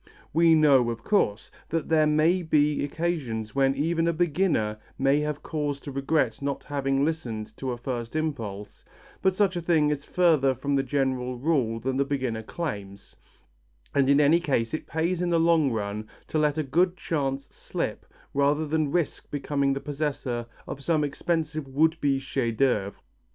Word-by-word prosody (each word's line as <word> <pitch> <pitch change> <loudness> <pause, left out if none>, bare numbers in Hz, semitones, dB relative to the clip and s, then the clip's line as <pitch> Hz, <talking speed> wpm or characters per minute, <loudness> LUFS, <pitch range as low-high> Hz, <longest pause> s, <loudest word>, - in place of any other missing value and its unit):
We 165 +1 +5
know, 140 -6 +5
of 115 0 -5
course, 120 - +1 0.2
that 165 -1 -1
there 155 -1 +4
may 155 +4 +3
be 150 -3 +2
occasions 140 -9 -2
when 135 0 +2
even 165 +3 +1
a 170 - +2
beginner 155 - +1 0.2
may 135 +2 +3
have 150 -1 -3
cause 145 -3 -2
to 145 - -7
regret 135 -2 0
not 140 0 -2
having 135 -1 0
listened 120 -10 -4
to 135 - -4
a 120 - -2
first 120 0 -5
impulse, 115 -11 -4 0.4
but 190 -1 +2
such 195 -2 +2
a 175 - -2
thing 160 -3 +3
is 145 -1 -2
further 155 -8 +3
from 140 +4 -2
the 135 - +3
general 130 -2 -1
rule 125 -5 0
than 130 +3 -2
the 140 - +3
beginner 130 -5 -2
claims, 100 - -6 0.8
and 140 -1 +3
in 140 +1 +5
any 150 +3 +5
case 130 -9 0
it 155 - -4
pays 170 +3 -1
in 180 - 0
the 170 -1 +3
long 165 -4 +3
run 105 -1 -3 0.2
to 155 - 0
let 150 0 +2
a 155 - +1
good 175 +6 +1
chance 135 -3 -2
slip - - -4 0.3
rather 145 +2 +2
than 155 -1 0
risk 170 -2 -1
becoming 140 -1 0
the 135 - -3
possessor 140 -4 -3 0.2
of 140 - -7
some 155 -1 +2
expensive 155 0 -2
would 160 +4 +1
be 140 -2 +2
chef 130 -3 -2
d'œuvre. 105 -6 +1
145 Hz, 175 wpm, -26 LUFS, 130-160 Hz, 0.8 s, We